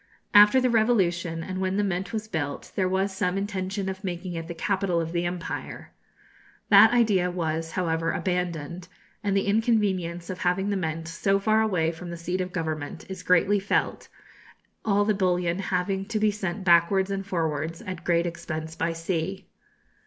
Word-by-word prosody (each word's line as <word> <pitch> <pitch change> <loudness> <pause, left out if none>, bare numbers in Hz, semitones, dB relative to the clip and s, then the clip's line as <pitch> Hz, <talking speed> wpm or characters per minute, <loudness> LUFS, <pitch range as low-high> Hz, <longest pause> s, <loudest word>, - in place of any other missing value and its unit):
After 210 +5 +8
the 255 -1 +2
revolution, 180 -8 +1
and 185 +1 -4
when 190 +1 0
the 205 - +2
Mint 190 0 -2
was 215 -1 -4
built, 145 -8 -4
there 185 -2 +1
was 190 +1 0
some 185 -1 0
intention 195 -1 -3
of 190 +1 -5
making 180 -1 -4
it 165 -1 -5
the 170 - -6
capital 190 -1 0
of 165 0 -3
the 175 0 0
empire. 175 -1 -6 0.8
That 205 +1 +8
idea 210 -7 +3
was, 165 -2 -3
however, 165 -2 0
abandoned; 180 -2 -3 0.4
and 200 -1 +1
the 195 - +1
inconvenience 200 -6 0
of 185 - -7
having 190 +3 0
the - - 0
Mint 165 -3 -3
so 195 +4 +1
far 215 +2 +2
away 180 -7 +1
from 170 +1 -9
the 170 - -6
seat 180 +2 -2
of 185 0 -4
government 160 -1 -4
is 190 -1 -6
greatly 185 +3 +3
felt, 195 - -1 0.8
all 205 -1 +2
the 215 - +2
bullion 180 -2 0
having 190 0 -1
to 230 -1 -2
be 215 0 +3
sent 195 -1 -4
backwards 185 +2 +4
and 195 0 -2
forwards 165 -3 -2
at 185 -2 -6
great 170 -1 +2
expense 160 -2 -5
by 165 0 -1
sea. 165 +3 -3
185 Hz, 175 wpm, -26 LUFS, 170-195 Hz, 0.8 s, After